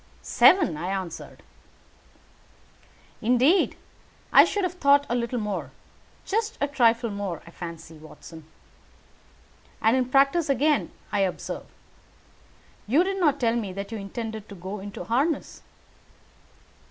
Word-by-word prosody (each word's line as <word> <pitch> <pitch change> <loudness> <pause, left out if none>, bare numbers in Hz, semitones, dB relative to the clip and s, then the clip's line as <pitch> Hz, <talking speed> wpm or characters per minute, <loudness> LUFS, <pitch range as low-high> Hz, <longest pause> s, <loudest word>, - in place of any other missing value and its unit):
"Seven," 275 - +4
I 175 - -4
answered. 190 -3 -6 1.8
"Indeed, 250 - +3 0.6
I - - +9
should 410 - -2
have 365 -1 -1
thought 285 -4 +4
a - - 0
little 240 +1 -2
more. 210 -2 -3 0.6
Just 445 +2 -1
a 285 - +1
trifle 235 -4 +2
more, 200 -5 -5
I 170 - -13
fancy, 165 -2 -9
Watson. 160 +1 -13 1.3
And 225 +3 +3
in 255 -1 +2
practice 280 +4 +3
again, 285 +3 +1 0.2
I 205 - 0
observe. 190 -2 -3 1.2
You 285 +11 +4
did 390 +1 -2
not 305 -6 +2
tell 230 -2 +1
me 215 -5 -3
that 200 +2 -6
you 225 - -4
intended 220 +1 -6
to 200 - -9
go 190 +3 -7
into 200 +1 -7
harness." 275 +7 -1
230 Hz, 130 wpm, -25 LUFS, 195-285 Hz, 1.8 s, I